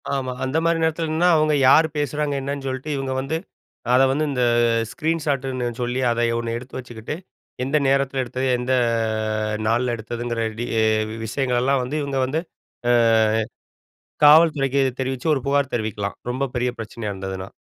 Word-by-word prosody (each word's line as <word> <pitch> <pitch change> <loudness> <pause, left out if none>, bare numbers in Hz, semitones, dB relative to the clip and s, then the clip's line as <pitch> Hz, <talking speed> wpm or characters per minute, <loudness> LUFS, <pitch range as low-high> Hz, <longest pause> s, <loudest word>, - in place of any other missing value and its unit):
ஆமா. 130 -2 -2
அந்த 130 +4 -1
மாரி 165 0 +2
நேரத்துலன்னா, 160 +1 +1
அவுங்க 155 -1 +3 0.2
யாரு 160 +3 +6
பேசுகிறாங்க? 145 0 -1
என்னன்னு 140 0 -4
சொல்லிட்டு, 130 +3 -4
இவங்க 135 -1 -2
வந்து, 140 +4 -2 0.6
அத 130 - +6
வந்து, 150 +3 0
இந்த 125 -2 0 0.5
ஸ்க்ரீன் 165 0 -1
ஷாட்டுன்னு 135 -4 -1
சொல்லி, 125 +1 -1
அதை 120 0 +1
ஒண்ணு 115 0 -3
எடுத்து 130 +2 -9
வச்சுக்கிட்டு, 120 +1 -7 0.5
எந்த 135 +4 +1
நேரத்தில 135 -1 +1
எடுத்தது? 130 +2 -3
எந்த 125 +1 -3 0.8
ஆ - - -2
நாள்ல 120 +2 +1
எடுத்ததுங்கிற 120 +1 -4 0.2
டீ 120 - -2 0.6
விஷயங்களெல்லாம் 130 +2 +1
வந்து 125 +4 -4
இவங்க 140 -2 -2
வந்து, 150 +5 -1 0.5
ஆ - - +5 1.3
காவல்துறைக்கு 145 -3 +5 0.2
தெரிவிச்சு, 130 +3 -2
ஒரு 135 - -2
புகார் 140 -1 +1
தெரிவிக்கலாம், 105 -3 -3
ரொம்ப 130 +2 -2
பெரிய 125 +1 +1
பிரச்சனையா 110 -1 -5
இருந்ததுனா. 95 0 -6
130 Hz, 145 wpm, -22 LUFS, 120-145 Hz, 1.3 s, யாரு